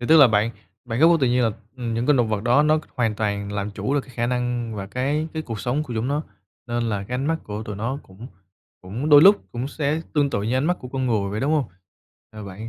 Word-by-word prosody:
thì 120 Hz, -, -4 dB
tức 160 Hz, -, +6 dB
là 145 Hz, -4 st, +9 dB
bạn 105 Hz, +1 st, +2 dB, 0.3 s
bản 120 Hz, 0 st, -3 dB
gốc 165 Hz, +2 st, +7 dB
của -, -, +5 dB
tự 130 Hz, -, +3 dB
nhiên, 125 Hz, +1 st, +2 dB
là, 115 Hz, -, +2 dB, 0.3 s
ừm, 120 Hz, -3 st, -3 dB
những 115 Hz, +2 st, -1 dB
cái 150 Hz, -, +4 dB
động 120 Hz, -3 st, +2 dB
vật 105 Hz, -2 st, -1 dB
đó 125 Hz, +5 st, +4 dB
nó 155 Hz, +1 st, +3 dB
c -, -, -9 dB
hoàn 115 Hz, -4 st, 0 dB
toàn 100 Hz, -1 st, -2 dB
làm 100 Hz, 0 st, -3 dB
chủ 130 Hz, +7 st, -2 dB
được 145 Hz, -, +2 dB
cái 130 Hz, -2 st, -16 dB
khả 120 Hz, -1 st, 0 dB
năng 120 Hz, -2 st, -2 dB
và 100 Hz, -2 st, -5 dB
cái 140 Hz, +9 st, -1 dB
cái 160 Hz, -, -2 dB
cuộc 115 Hz, -7 st, -6 dB
sống 130 Hz, +5 st, -1 dB
của 125 Hz, -6 st, -7 dB
chúng 115 Hz, +3 st, -1 dB
nó, 145 Hz, +2 st, 0 dB, 0.4 s
nên 120 Hz, -1 st, -1 dB
là 100 Hz, -3 st, -2 dB
cái 120 Hz, +5 st, -6 dB
ánh 130 Hz, +3 st, -1 dB
mắt 165 Hz, +1 st, +1 dB
của 105 Hz, +1 st, -5 dB
tụi 105 Hz, -2 st, -6 dB
nó 120 Hz, +7 st, -3 dB
cũng 95 Hz, +6 st, -12 dB, 0.5 s
cũng 110 Hz, +11 st, -4 dB
đôi 145 Hz, -1 st, +8 dB
lúc 200 Hz, +3 st, +8 dB, 0.2 s
cũng 120 Hz, +3 st, -3 dB
sẽ 150 Hz, +1 st, -1 dB
tương 145 Hz, -2 st, +2 dB
tự 100 Hz, -, -1 dB
như 115 Hz, +4 st, -1 dB
ánh 130 Hz, -, +1 dB
mắt 180 Hz, +3 st, +1 dB
của 125 Hz, -, -8 dB
con 130 Hz, 0 st, -2 dB
người 105 Hz, -5 st, 0 dB
vậy, 105 Hz, +2 st, -3 dB
đúng 145 Hz, +3 st, +1 dB
hông? 150 Hz, -3 st, +2 dB, 0.7 s
À, 110 Hz, -1 st, -9 dB
bạn 100 Hz, +3 st, -8 dB
120 Hz, 290 wpm, -23 LUFS, 110-140 Hz, 0.7 s, là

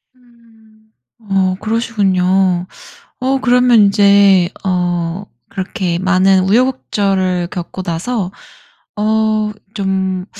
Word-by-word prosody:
음. 225 Hz, -3 st, -26 dB, 0.4 s
어 190 Hz, -1 st, +1 dB
그러시군요. 190 Hz, -5 st, 0 dB, 0.5 s
어 265 Hz, +1 st, 0 dB
그러면 250 Hz, -2 st, +4 dB
인제 200 Hz, -2 st, +4 dB
어 175 Hz, 0 st, -2 dB, 0.2 s
그렇게 185 Hz, -2 st, -3 dB
많은 190 Hz, 0 st, +3 dB
우여곡절을 195 Hz, -7 st, 0 dB
겪고 185 Hz, +1 st, -6 dB
나서 185 Hz, +3 st, -3 dB, 0.6 s
어 215 Hz, 0 st, 0 dB, 0.2 s
좀 190 Hz, -2 st, -2 dB
195 Hz, 175 characters per minute, -15 LUFS, 185-220 Hz, 0.6 s, 그러면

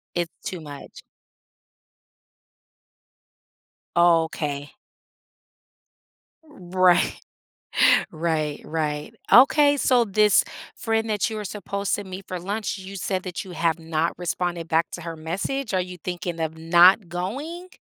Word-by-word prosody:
It's 175 Hz, -1 st, -2 dB
too 180 Hz, -, -5 dB
much. 145 Hz, -2 st, -10 dB, 2.9 s
Okay. 160 Hz, -4 st, +2 dB, 1.7 s
Right. 185 Hz, -, +1 dB, 0.9 s
Right, 155 Hz, -2 st, -2 dB
right, 150 Hz, -2 st, -3 dB, 0.2 s
okay, 285 Hz, +5 st, +6 dB
so 250 Hz, -3 st, +3 dB
this 210 Hz, 0 st, +4 dB, 0.3 s
friend 225 Hz, -1 st, -1 dB
that 210 Hz, +1 st, 0 dB
you 220 Hz, -, -5 dB
were 210 Hz, -, -5 dB
supposed 200 Hz, 0 st, -3 dB
to 205 Hz, -, -6 dB
meet 190 Hz, 0 st, -8 dB
for 185 Hz, -, -4 dB
lunch, 205 Hz, +3 st, -3 dB
you 190 Hz, +1 st, -9 dB
said 185 Hz, 0 st, -2 dB
that 180 Hz, +2 st, -5 dB
you 185 Hz, -, -10 dB
have 165 Hz, -1 st, 0 dB
not 165 Hz, 0 st, -1 dB
responded 175 Hz, -1 st, -2 dB
back 165 Hz, +1 st, +2 dB
to 175 Hz, -, -7 dB
her 165 Hz, -1 st, -6 dB
message, 195 Hz, +10 st, -3 dB
are 185 Hz, -, +2 dB
you 180 Hz, 0 st, -7 dB
thinking 175 Hz, 0 st, -5 dB
of 160 Hz, 0 st, -3 dB
not 175 Hz, +4 st, +5 dB
going? 280 Hz, -, -5 dB
180 Hz, 120 wpm, -24 LUFS, 165-205 Hz, 2.9 s, okay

